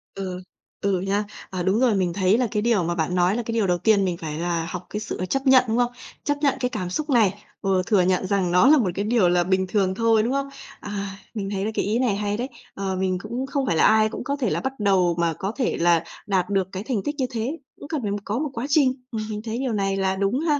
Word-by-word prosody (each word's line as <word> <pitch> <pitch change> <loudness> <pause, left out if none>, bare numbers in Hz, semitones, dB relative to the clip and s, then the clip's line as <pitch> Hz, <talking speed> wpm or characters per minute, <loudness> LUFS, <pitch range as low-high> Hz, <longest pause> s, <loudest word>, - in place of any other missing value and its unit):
Ừ, 185 -2 -5 0.4
ừ 195 -2 +1
nha. 200 +2 0 0.2
À, 185 -2 -3
đúng 190 +4 +2
rồi, 245 -4 +3
mình 180 -3 0
thấy 195 +3 +3
là 250 -2 +1
cái 210 - 0
điều 225 -6 +2
mà 170 +1 -1
bạn 170 +1 -1
nói 180 +3 +3
là 240 - -2
cái 230 - -4
điều 220 -3 +1
đầu 175 -1 +2
tiên 205 +1 +3
mình 180 -2 -1
phải 155 -2 -5
là 170 -1 -1
học 180 0 -6
cái 210 - -3
sự 185 - -4
chấp 270 0 -1
nhận, 260 -1 +7
đúng 225 +1 0
không? 245 0 +2 0.3
Chấp 290 0 0
nhận 280 -3 +3
cái 250 - 0
cảm 195 -7 -4
xúc 300 - -3
này, 210 -5 +2 0.2
ừ, 190 -2 +2
thừa 205 -4 +4
nhận 185 +1 +1
rằng 190 -3 +1
nó 180 +7 +5
là 305 +2 +7
một 225 -9 +2
cái 200 - -1
điều 215 -5 +3
là 175 0 +3
bình 190 +1 +1
thường 190 -2 +1
thôi, 225 0 +3
đúng 245 +4 0
không? 275 0 -1 0.3
À, 200 -1 -5 0.2
mình 200 -3 -3
thấy 195 -1 -2
là 220 - -1
cái - - -1
ý 220 +4 +1
này 245 -6 +2
hay 205 0 -1
đấy. 250 +3 -3 0.2
Ờ, 195 -1 -3
mình 185 0 0
cũng 240 +5 -3
không 275 0 -1
phải 190 - +1
là - - +4
ai 220 0 +5
cũng - - -6
có 280 +2 -1
thể 270 -4 -1
là - - 0
bắt 265 0 -2
đầu 190 -4 +3
mà 170 -1 +2
có 195 +5 -3
thể 255 - 0
là 170 -1 +3 0.2
đạt 190 -2 +1
được 195 -2 +1
cái 190 +2 -5
thành 225 -5 -2
tích 290 - -2
như 265 - +1
thế, 245 +6 -2 0.2
cũng 285 - -9
cần 310 -3 -2
phải 205 -3 -2
có 215 +4 -1
một 300 -1 -1
quá 235 +1 -3
trình. 270 -3 +2
Ừm, 220 -1 -3
mình 210 -1 -4
thấy 225 0 -3
điều 260 -4 -1
này 195 -1 0
là 190 0 +1
đúng 200 +6 0
ha. 300 -2 +1
205 Hz, 285 wpm, -24 LUFS, 185-240 Hz, 0.4 s, nhận